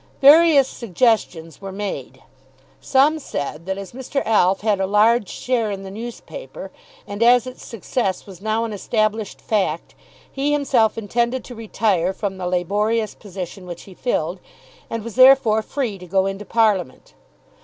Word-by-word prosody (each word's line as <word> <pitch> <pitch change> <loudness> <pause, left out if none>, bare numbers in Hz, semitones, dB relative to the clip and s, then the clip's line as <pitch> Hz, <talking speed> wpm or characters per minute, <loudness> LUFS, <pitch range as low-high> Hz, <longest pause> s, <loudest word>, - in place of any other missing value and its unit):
Various 290 -1 +7
suggestions 190 - -1
were 195 -1 -6
made. 200 +1 -6 0.6
Some 290 +4 +3
said 150 - -5
that 190 0 -2
as 195 -1 -8
Mr. 265 +2 -3
Alf 195 -3 +3
had 210 -2 +1
a 190 - 0
large 210 +1 +3
share 240 -4 -1
in 195 -1 -5
the 190 - -8
newspaper, 235 - -8 0.3
and 205 +2 -7
as 245 +1 +5
its 255 0 -9
success 215 -2 -3
was 190 -3 -12
now 220 +2 0
an 225 - -5
established 215 0 -1
fact, 190 -7 -1 0.4
he 275 +2 -1
himself 255 -7 +2
intended 235 +3 -1
to 250 - -10
retire 205 -5 0
from 195 -1 -4
the 180 - -3
laborious 210 +5 0
position 185 -2 -8
which 175 -1 -8
he 195 - -13
filled, 180 -5 -2 0.5
and 230 -2 -4
was 230 -1 -7
therefore 255 -3 +6
free 220 -4 -3
to 180 - -11
go 190 +2 +1
into 195 +1 -4
Parliament. 200 - 0
215 Hz, 155 wpm, -21 LUFS, 190-240 Hz, 0.6 s, Various